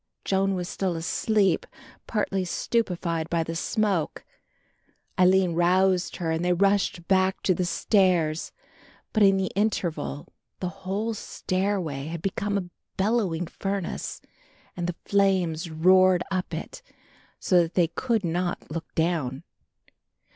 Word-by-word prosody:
Joan 195 Hz, 0 st, +1 dB
was 180 Hz, -1 st, -3 dB
still 185 Hz, -2 st, -2 dB
asleep, 195 Hz, +3 st, +1 dB, 0.4 s
partly 195 Hz, -3 st, 0 dB
stupified 175 Hz, -5 st, -1 dB
by 170 Hz, -1 st, +1 dB
the 165 Hz, +1 st, -5 dB
smoke. 195 Hz, -3 st, -1 dB, 0.9 s
Aline 185 Hz, -1 st, +4 dB
roused 180 Hz, +2 st, +2 dB
her 165 Hz, -3 st, -2 dB
and 160 Hz, +1 st, -1 dB
they 180 Hz, 0 st, +3 dB
rushed 195 Hz, -2 st, +1 dB
back 190 Hz, 0 st, +2 dB
to 185 Hz, -, +3 dB
the 180 Hz, 0 st, -1 dB
stairs, 175 Hz, -5 st, +2 dB, 0.6 s
but 215 Hz, -, +2 dB
in 195 Hz, -1 st, +6 dB
the 190 Hz, -1 st, -1 dB
interval 170 Hz, -8 st, -2 dB, 0.3 s
the 180 Hz, -, -2 dB
whole 195 Hz, +4 st, -3 dB
stairway 185 Hz, -8 st, -2 dB
had 165 Hz, 0 st, -6 dB
become 200 Hz, +1 st, -1 dB
a 180 Hz, -3 st, -4 dB, 0.3 s
bellowing 195 Hz, -5 st, +1 dB
furnace 195 Hz, +2 st, -4 dB, 0.5 s
and 175 Hz, -1 st, -3 dB
the 175 Hz, -, -3 dB
flames 185 Hz, -5 st, +1 dB
roared 185 Hz, +3 st, +4 dB
up 185 Hz, -1 st, -2 dB
it, -, -, -6 dB, 0.6 s
so 180 Hz, -2 st, +4 dB
that 165 Hz, 0 st, -3 dB
they 175 Hz, -2 st, +4 dB
could 225 Hz, +5 st, -1 dB
not 175 Hz, -1 st, -2 dB
look 165 Hz, +1 st, -6 dB
down. 160 Hz, -5 st, 0 dB
185 Hz, 130 wpm, -26 LUFS, 170-195 Hz, 0.9 s, in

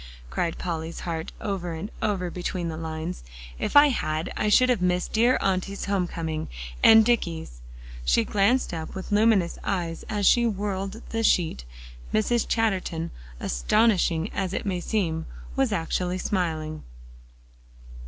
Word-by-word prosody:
cried 165 Hz, -, -1 dB
Polly's 165 Hz, -1 st, -4 dB
heart 165 Hz, -2 st, -4 dB
over 190 Hz, -5 st, -3 dB
and 190 Hz, +8 st, -6 dB
over 185 Hz, -4 st, -1 dB
between 175 Hz, -1 st, -3 dB
the 160 Hz, -, -4 dB
lines. 160 Hz, +2 st, -5 dB, 0.4 s
"If -, -, -2 dB
I 290 Hz, 0 st, +9 dB
had, 155 Hz, -, -2 dB
I 210 Hz, -, 0 dB
should 255 Hz, +4 st, +5 dB
have 245 Hz, -7 st, +2 dB
missed 180 Hz, 0 st, 0 dB
dear 235 Hz, +3 st, +4 dB
Auntie's 195 Hz, +1 st, -1 dB
home 195 Hz, -3 st, 0 dB
coming, 160 Hz, -2 st, -4 dB, 0.3 s
and 220 Hz, -1 st, +8 dB
Dicky's." 165 Hz, -, -1 dB, 0.4 s
She -, -, +3 dB
glanced 210 Hz, -, +2 dB
up 160 Hz, -1 st, -5 dB
with 190 Hz, +2 st, -6 dB
luminous 205 Hz, -4 st, +3 dB
eyes 170 Hz, -4 st, -2 dB
as 210 Hz, -2 st, 0 dB
she 235 Hz, +3 st, +5 dB
whirled 200 Hz, 0 st, -3 dB
the 225 Hz, -, -1 dB
sheet. 160 Hz, -, +2 dB, 0.5 s
Mrs. 225 Hz, +2 st, +1 dB
Chatterton, 185 Hz, -7 st, 0 dB, 0.3 s
astonishing 175 Hz, -, +2 dB
as 195 Hz, -1 st, -2 dB
it -, -, -3 dB
may 185 Hz, -3 st, -1 dB
seem, 170 Hz, -5 st, -1 dB, 0.3 s
was 270 Hz, -4 st, +2 dB
actually 180 Hz, 0 st, -1 dB
smiling. 160 Hz, -5 st, -2 dB
185 Hz, 145 wpm, -26 LUFS, 165-210 Hz, 0.5 s, I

